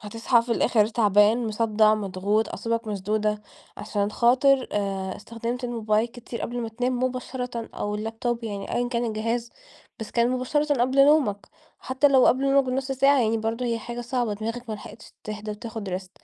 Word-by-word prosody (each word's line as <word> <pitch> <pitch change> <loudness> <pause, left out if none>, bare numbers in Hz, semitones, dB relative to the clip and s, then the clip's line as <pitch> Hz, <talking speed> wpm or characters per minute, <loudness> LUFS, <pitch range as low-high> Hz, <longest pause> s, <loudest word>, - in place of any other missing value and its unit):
هتصحى 230 +3 +1
في 235 - -2
الآخر 220 -2 +3
تعبان، 215 +1 +3
مصدع، 215 0 +3
مضغوط، 205 +1 -1
أعصابك 230 0 -3
مشدودة، 210 +1 -1 0.3
عشان 205 -1 -2
خاطر 255 +4 +3
آآ 195 -2 -2
استخدمت 235 +3 -5
الموبايل 225 -2 0
كتير 235 0 -9
قبل 240 +1 -4
ما 230 - -3
تنام 245 +2 -2
مباشرةً، 250 -2 -4
أو 205 0 -3
اللابتوب 225 +2 -3
يعني 200 -3 -4
أيًا 245 0 0
كان 240 -1 -1
الجهاز، 230 +2 -2 0.5
بس 220 - -6
كان 235 +1 +2
مُباشرةً 290 +4 0
قبل 265 +2 +4
نومك، 270 -10 +2 0.3
حتى 260 +3 +2
لو 265 -2 +5
قبل 275 +2 +3
نومك 275 0 +5
بنص 265 +1 -2
ساعة، 275 +1 +4
يعني 225 -1 +2
برضه 225 +3 -2
هي 230 -1 0
حاجة 240 +1 -6
صعبة 240 -2 -1
دماغك 230 +3 -5
ما 215 - -2
لحقتش 215 +1 -12
تهدى 215 0 -5
وتاخد 220 -1 -6
rest 185 -1 -15
230 Hz, 170 wpm, -25 LUFS, 215-250 Hz, 0.5 s, لو